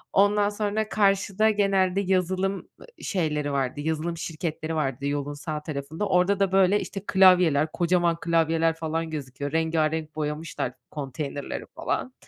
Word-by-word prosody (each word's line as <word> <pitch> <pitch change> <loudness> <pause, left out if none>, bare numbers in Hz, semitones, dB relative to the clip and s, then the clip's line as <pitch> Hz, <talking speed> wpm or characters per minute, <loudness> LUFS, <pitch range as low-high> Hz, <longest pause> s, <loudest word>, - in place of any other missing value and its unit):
Ondan 205 +1 +4
sonra 210 +1 -2
karşıda 200 +1 +2
genelde 195 -2 +2
yazılım, 185 0 +1
ııı, 195 - -12 0.2
şeyleri 150 -6 -1
vardı, 135 +1 -1
yazılım 160 +2 -2
şirketleri 160 -1 -4
vardı 140 -3 -2
yolun 145 0 -2
sağ 150 0 -5
tarafında. 155 +6 -4
Orada 180 +2 +3
da, 195 -2 +2
böyle, 195 +1 +4
işte, 195 -1 -6
klavyeler, 180 -6 +5
kocaman 175 -1 +1
klavyeler 165 -1 +2
falan 165 0 -3
gözüküyor. 140 -1 -5
Rengârenk 160 -1 0
boyamışlar 150 -4 -3 0.2
konteynerleri 145 0 -5
falan. 255 - -2
165 Hz, 130 wpm, -26 LUFS, 150-190 Hz, 0.2 s, klavyeler